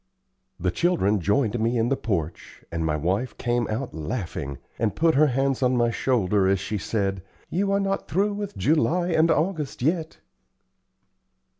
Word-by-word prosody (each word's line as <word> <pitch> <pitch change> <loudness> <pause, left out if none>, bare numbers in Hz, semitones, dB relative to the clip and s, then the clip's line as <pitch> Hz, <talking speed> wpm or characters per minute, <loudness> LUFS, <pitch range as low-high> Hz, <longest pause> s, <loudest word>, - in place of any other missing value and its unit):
The 90 +1 0
children 105 - +2
joined 110 +5 +1
me 115 +2 +1
in 115 +1 +1
the 135 - +2
porch, 85 - -4
and 85 -1 -2
my 80 -1 0
wife 95 - -1
came 120 -1 0
out 120 +4 -3
laughing, 80 - -4 0.2
and 110 -2 0
put 165 0 +3
her 155 +2 +5
hand 135 0 0
on 125 -1 +2
my 120 -1 +2
shoulder 105 -6 +1
as 95 0 +2
she 100 +2 -3
said, 100 -2 -1 0.3
"You 195 +3 0
are 200 - +2
not 195 0 -1
through 205 +3 +1
with 205 0 -5
July 165 +3 +2
and 165 -1 +3
August 155 -6 0
yet." 160 +2 0
120 Hz, 165 wpm, -25 LUFS, 100-160 Hz, 0.3 s, her